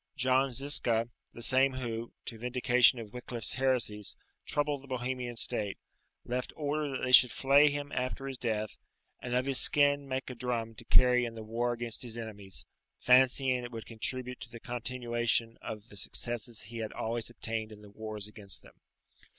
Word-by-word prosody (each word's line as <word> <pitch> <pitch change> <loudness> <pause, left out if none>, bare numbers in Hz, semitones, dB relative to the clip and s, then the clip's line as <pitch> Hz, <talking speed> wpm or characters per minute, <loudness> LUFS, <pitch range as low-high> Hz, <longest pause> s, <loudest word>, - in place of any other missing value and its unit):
John 130 +1 +3
Zisca, 120 -3 +1 0.2
the 120 - -8
same 130 +2 +4
who, 120 -2 -4
to 115 - -6
vindication 125 +1 +4
of 110 -3 -8
Wicliffe's 120 -2 -3
heresies, 125 -6 0 0.3
troubled 145 -1 0
the 140 - -14
Bohemian 125 -1 -3
state, 105 -2 +1 0.5
left 125 +1 -2
order 150 0 -1
that 135 - -4
they 130 - 0
should 125 -1 +9
flay 140 +4 +5
him 145 0 -4
after 130 +2 -2
his 135 -2 -4
death, 110 -3 -2 0.4
and 125 0 -2
of 125 +1 +2
his 135 -1 0
skin 145 -1 +4
make 130 0 -2
a - - -5
drum 115 -2 -2
to 115 - -12
carry 125 0 +5
in 115 -1 -4
the 110 - -7
war 115 +3 -1
against 120 -1 -3
his 120 -2 -4
enemies, 105 -4 -7 0.3
fancying 130 0 +4
it 120 - -6
would 115 -2 -6
contribute 125 +2 -3
to - - -7
the 115 - -9
continuation 120 -1 -1
of 110 +1 -7
the 100 - -11
successes 120 +3 -2
he 115 +3 -8
had 110 -1 -4
always 115 0 -2
obtained 115 -2 -4
in 105 -1 -12
the 105 - -13
wars 110 -1 -6
against 105 -2 -7
them. - - -16
120 Hz, 180 wpm, -31 LUFS, 115-130 Hz, 0.5 s, should